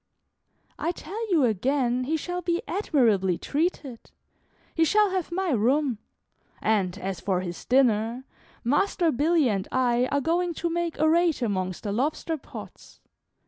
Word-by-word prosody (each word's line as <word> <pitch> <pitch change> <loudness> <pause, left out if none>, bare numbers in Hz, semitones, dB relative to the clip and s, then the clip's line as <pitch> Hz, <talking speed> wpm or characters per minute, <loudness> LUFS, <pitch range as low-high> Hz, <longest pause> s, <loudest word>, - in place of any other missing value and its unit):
"I 340 - -1
tell 425 +7 -6
you 315 -7 +4
again 250 +3 0
he 315 +4 0
shall 355 +3 -4
be 345 0 -1
admirably 225 - +2
treated; 290 -6 -3 0.6
he 325 - +2
shall 415 +4 +3
have 370 -3 -2
my 370 0 -1
room; 255 +1 +1 0.6
and, 195 -4 0
as 195 -1 -4
for 185 -3 0
his 175 -2 -6
dinner, 240 -1 +2 0.4
Master 330 +6 +2
Billy 305 +2 +2
and 200 -4 -1
I 250 -1 +2
are 285 +1 0
going 340 +3 0
to 340 +2 -2
make 340 -1 -2
a 315 - +3
raid 330 -4 +2
amongst 185 -4 -2
the 205 - -2
lobster 295 +8 -1
pots. 280 - -12
275 Hz, 145 wpm, -26 LUFS, 225-340 Hz, 0.6 s, you